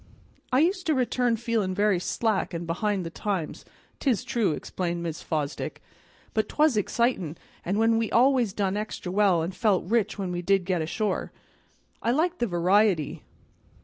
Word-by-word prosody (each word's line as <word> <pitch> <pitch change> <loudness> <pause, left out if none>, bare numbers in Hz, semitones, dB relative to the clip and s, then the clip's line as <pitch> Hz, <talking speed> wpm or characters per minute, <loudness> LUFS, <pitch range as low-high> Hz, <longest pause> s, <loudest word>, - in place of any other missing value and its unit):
"I 255 +2 +4
used 365 +2 +1
to 310 - +3
return 245 -2 +1
feelin' 220 -5 -1
very 205 -2 +2
slack 205 -1 -1
an' 170 +1 -4
behind 185 +3 -1
the 165 - -5
times, 190 -4 -3 0.3
'tis 250 -4 +1
true," 235 -6 +1
explained 170 +1 -3
Mrs. 165 -1 -5
Fosdick, 150 -3 -3 0.5
"but 220 - 0
'twas 300 -4 +3
excitin', 210 -6 0 0.3
an' 195 +4 -1 0.2
we 225 - -1
always 250 -3 +4
done 195 0 -1
extra 210 -3 -4
well, 190 -4 +3
and 175 +3 -3
felt 210 -8 +2
rich 215 +1 +1
when 190 -3 -3
we 175 0 -2
did 195 0 +2
get 180 -3 0
ashore. 190 +5 -2 0.7
I - - 0
liked 325 +7 +1
the 240 - +1
variety. 180 -2 +2
205 Hz, 160 wpm, -26 LUFS, 180-235 Hz, 0.7 s, I